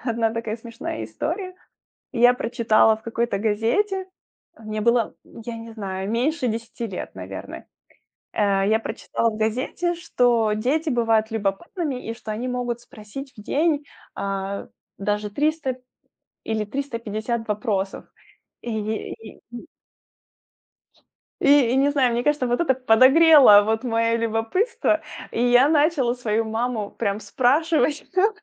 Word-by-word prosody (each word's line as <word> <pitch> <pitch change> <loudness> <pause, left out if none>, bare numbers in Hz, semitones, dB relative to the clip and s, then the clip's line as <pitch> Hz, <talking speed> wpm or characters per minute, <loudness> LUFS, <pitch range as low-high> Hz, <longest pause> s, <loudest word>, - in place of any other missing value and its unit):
1 230 -2 0
такая 230 -1 -3
смешная 230 - -6
история. 340 - -4 0.6
Я 245 0 +5
прочитала 225 -2 +3
в 220 - -21
какой-то 235 0 -1
газете, 235 - 0 0.5
э, - - -17
мне 215 0 -4
было, 235 0 +2
я 230 +1 -9
не 230 0 -9
знаю, 195 -3 -5
меньше 255 +4 0
10 230 +1 -5
лет, 190 -4 -7
наверное. - - -8 0.7
Э, 200 -2 +2
я 220 +1 +3
прочитала 230 0 -2
в 215 - -7
газете, 255 +11 -1
что 240 -9 +1
дети 280 +9 0
бывают 225 -3 +2
любопытными 250 - -3
и 225 - -3
что 220 -2 -7
они 230 +4 -3
могут 245 -1 -2
спросить 240 +6 -10
в - - -9
день, 295 +3 +1 0.3
а, 195 0 -4 0.3
даже, 210 +1 -2
300 285 +1 -1 0.7
или 220 -1 -1
350 230 -2 -4
вопросов. 210 -3 -2 0.6
Ие 220 -2 -3
и 225 -1 -12
и 240 - -9 1.7
И - - +2 0.2
и - - +2
не 275 +2 +3
знаю, 265 -4 +2
мне 235 +1 0
кажется, 295 -3 +1
вот 245 0 0
это 315 -6 +3
подогрело 260 -1 +7
вот 220 +3 0
моё 230 -1 +1
любопытство. 230 - 0 0.3
И 230 - -1
я 245 +3 +5
начала 295 -5 +2
свою 225 -2 -1
маму 220 -1 -2
прям 200 +1 -2
спрашивать 290 +9 +1
всё 375 +3 +3
230 Hz, 135 wpm, -23 LUFS, 215-270 Hz, 1.7 s, подогрело